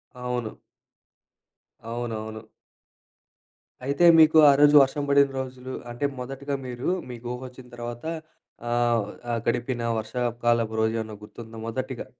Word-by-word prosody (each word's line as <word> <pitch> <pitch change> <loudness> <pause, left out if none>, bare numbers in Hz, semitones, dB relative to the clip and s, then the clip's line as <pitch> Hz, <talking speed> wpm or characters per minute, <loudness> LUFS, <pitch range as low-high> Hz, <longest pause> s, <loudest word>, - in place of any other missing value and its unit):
అవును. 125 -3 -4 1.3
అవునవును. 110 -2 -5 1.4
అయితే 140 +6 +2
మీకు 160 0 +7
ఆ - - +8
రోజు 145 0 +6
వర్షం 135 +2 +1
బడిన 140 0 +5
రోజులు 130 0 -6 0.2
అంటే 120 +4 -2
మొదటిగా 135 +2 -4
మీరు 125 0 -3 0.2
మీకూహొచ్చిన 125 +1 -7
తర్వాత 120 0 -7 0.7
ఆహ్, 120 -1 +2 0.3
ఆ - - 0
గడిపిన 120 +1 -1 0.2
వర్షాపుకాలపు 120 0 0
రోజేమన్నా 110 -1 -1
గుర్తుందా 110 +1 -10
మొదటిగా? 130 +2 -4
120 Hz, 105 wpm, -25 LUFS, 115-130 Hz, 1.4 s, ఆ